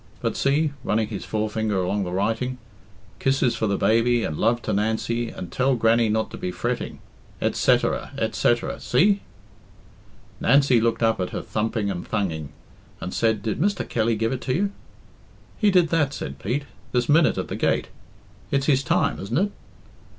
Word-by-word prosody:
But - - -2
see," 145 +2 +1
running 110 -2 0
his 105 - -5
forefinger 110 -1 -1
along 95 +2 0
the 90 - -4
writing 115 +7 -1 0.6
"'Kisses 135 -2 +2
for 110 - 0
the 100 -1 0
baby, 115 +1 +3
and 75 - -2
love 115 +8 +2
to 110 - -1
Nancy, 110 +3 0
and 90 - -8
tell 130 +1 +2
Grannie 115 0 +3
not 110 +1 0
to - - -7
be 90 - -2
fretting? 90 - -3 0.4
et - - +1
setterer, - - +2
et - - 0
setterer. 120 0 +1
See?" 195 +11 +3 1.2
Nancy 135 -2 +4
looked 115 0 +1
up 115 -2 +2
at 90 - -1
her - - -5
thumping 110 -1 -1
and 85 -2 -4
thunging, 80 -9 -2 0.5
and 90 - -5
said, 110 -3 +1
"Did 110 +1 -2
Mr. 200 +3 0
Kelly 115 0 +1
give 115 +1 0
it 130 0 -4
you?" 195 +10 +1 0.9
"He 210 - +4
did 180 -4 +4
that," 145 -5 +1
said - - -6
Pete, 140 +4 -2 0.3
"this 125 -1 +1
minute 155 +2 +4
at - - -2
the - - -4
gate. - - 0 0.6
It's 135 -1 +1
his 135 -3 +3
time, 130 - +1
isn't 100 - -2
it?" 200 +4 +1
115 Hz, 175 wpm, -24 LUFS, 105-135 Hz, 1.2 s, Nancy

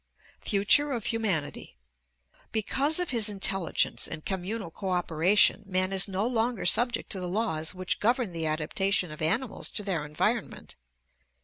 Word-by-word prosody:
Future 210 +9 +4
of 230 -3 -4
Humanity 190 - -2 0.7
Because 270 +8 +1
of 360 -4 0
his 225 -4 +1
intelligence 195 -3 +1
and 155 -1 -7
communal 190 0 -3
cooperation 180 +2 +2
man 185 0 +2
is 195 +1 +2
no 195 +2 -2
longer 235 -2 -1
subject 240 +7 +2
to 190 - -4
the 180 -1 -5
laws 175 -6 -2
which 185 0 -3
govern 235 -3 0
the 165 -1 -1
adaptation 170 +4 0
of 155 - -10
animals 225 +10 -1
to 210 - -5
their 180 -6 -2
environment. 150 0 -3
195 Hz, 140 wpm, -27 LUFS, 175-225 Hz, 0.7 s, Future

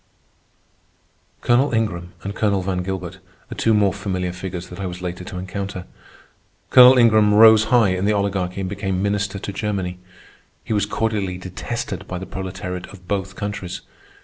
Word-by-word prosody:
Colonel 125 +4 +3
Ingram 90 -6 -2
and 100 - -4
Colonel 100 -3 0
Van 90 -1 -1
Gilbert 95 0 -5 0.3
are - - -5
two 115 - +1
more 105 -3 +3
familiar 95 -3 -3
figures 90 -1 -6
that 90 - -10
I 95 - -3
was 90 0 -7
later 90 0 -5
to 95 - -7
encounter. 95 0 -5 0.9
Colonel 125 +1 +9
Ingram 110 -3 +5
rose 110 0 +8
high 115 -3 +4
in 95 +1 -1
the 105 - +3
Oligarchy 100 -2 -1
and 95 - -2
became 95 -1 -2
Minister 100 -1 -1
to 100 0 -6
Germany. 95 -3 -3 0.6
He - - -3
was 105 -1 +1
cordially 105 -5 -1
detested 95 +3 -5
by 90 - -4
the 95 - -6
proletariat 95 -2 -6
of 90 -2 -15
both 100 -1 -2
countries. 95 -3 -5
95 Hz, 165 wpm, -21 LUFS, 90-105 Hz, 0.9 s, Colonel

